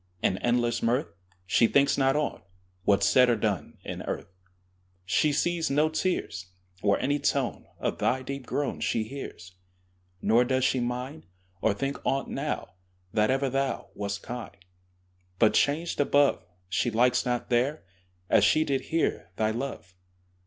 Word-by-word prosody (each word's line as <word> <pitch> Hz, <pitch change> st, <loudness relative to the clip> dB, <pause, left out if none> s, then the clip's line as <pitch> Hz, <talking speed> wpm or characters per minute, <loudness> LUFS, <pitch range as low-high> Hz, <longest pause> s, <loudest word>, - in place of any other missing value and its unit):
In 95 Hz, -, +1 dB
endless 120 Hz, 0 st, +1 dB
mirth, 115 Hz, -7 st, 0 dB, 0.3 s
She 115 Hz, +5 st, +4 dB
thinks 140 Hz, +3 st, +3 dB
not 135 Hz, 0 st, +2 dB
on 150 Hz, -1 st, -1 dB, 0.4 s
What's 100 Hz, -1 st, +4 dB
said 125 Hz, +5 st, +5 dB
or 120 Hz, -, +4 dB
done 105 Hz, -3 st, -2 dB
In -, -, -5 dB
earth: 95 Hz, -, -5 dB, 0.7 s
She 150 Hz, +10 st, +2 dB
sees 170 Hz, +2 st, 0 dB
no 150 Hz, +3 st, +3 dB
tears, 155 Hz, -, -2 dB, 0.3 s
Or 100 Hz, -1 st, +3 dB
any 145 Hz, +2 st, 0 dB
tone 140 Hz, -3 st, -1 dB
Of -, -, -2 dB
thy 130 Hz, +1 st, +1 dB
deep 140 Hz, -1 st, -6 dB
groan 145 Hz, -1 st, -2 dB
She 115 Hz, -, 0 dB
hears; 110 Hz, -7 st, -8 dB, 0.7 s
Nor 115 Hz, +5 st, +4 dB
does 130 Hz, +1 st, +1 dB
she 130 Hz, -, +2 dB
mind, 125 Hz, -, -4 dB, 0.3 s
Or 105 Hz, -2 st, +2 dB
think 135 Hz, +6 st, -3 dB
on't 135 Hz, 0 st, 0 dB
now, 145 Hz, +2 st, -3 dB, 0.4 s
That 105 Hz, 0 st, +3 dB
ever 135 Hz, +1 st, +2 dB
thou 135 Hz, +1 st, -1 dB
Wast 100 Hz, -1 st, -4 dB
kind: 120 Hz, -3 st, -7 dB, 0.8 s
But 110 Hz, +1 st, +4 dB
changed 155 Hz, +4 st, +1 dB
above, 145 Hz, -9 st, +3 dB, 0.2 s
She 95 Hz, +6 st, 0 dB
likes 120 Hz, +2 st, +3 dB
not 125 Hz, 0 st, -2 dB
there, 130 Hz, +6 st, +1 dB, 0.4 s
As -, -, +4 dB
she 155 Hz, -, +4 dB
did 135 Hz, -3 st, 0 dB
here, 165 Hz, -, -1 dB
Thy 110 Hz, +2 st, +1 dB
love. 115 Hz, -6 st, -5 dB
125 Hz, 150 wpm, -27 LUFS, 110-140 Hz, 0.8 s, said